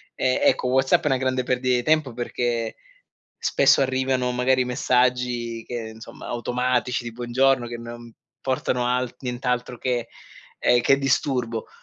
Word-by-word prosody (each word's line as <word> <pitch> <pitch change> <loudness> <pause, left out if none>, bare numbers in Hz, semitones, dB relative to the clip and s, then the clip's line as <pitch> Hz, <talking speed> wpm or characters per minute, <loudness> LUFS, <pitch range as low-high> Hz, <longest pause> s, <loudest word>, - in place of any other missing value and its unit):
Eh, 130 0 +1
ecco, - - +3
WhatsApp 130 +1 +3
è - - 0
una 135 -2 +2
grande 130 0 0
perdita 125 0 +1
di 120 - -2
tempo, 155 -1 +2
perché 120 -1 -2 0.6
spesso 140 0 +3
arrivano 130 -1 0
magari 125 +1 +2
messaggi 125 -2 0
che 115 -2 -5
insomma, 110 0 -11
automatici 125 +1 -1
di 120 - -6
buongiorno, 125 +1 +1
che 120 0 -6
non 120 0 -10 0.3
portano 130 -1 -1
al 125 0 0
nient'altro 125 -1 -2
che 120 -1 -1 0.5
ehm, 120 0 +4
che 135 +3 +4
disturbo. 130 -4 0
125 Hz, 140 wpm, -24 LUFS, 120-130 Hz, 0.6 s, ehm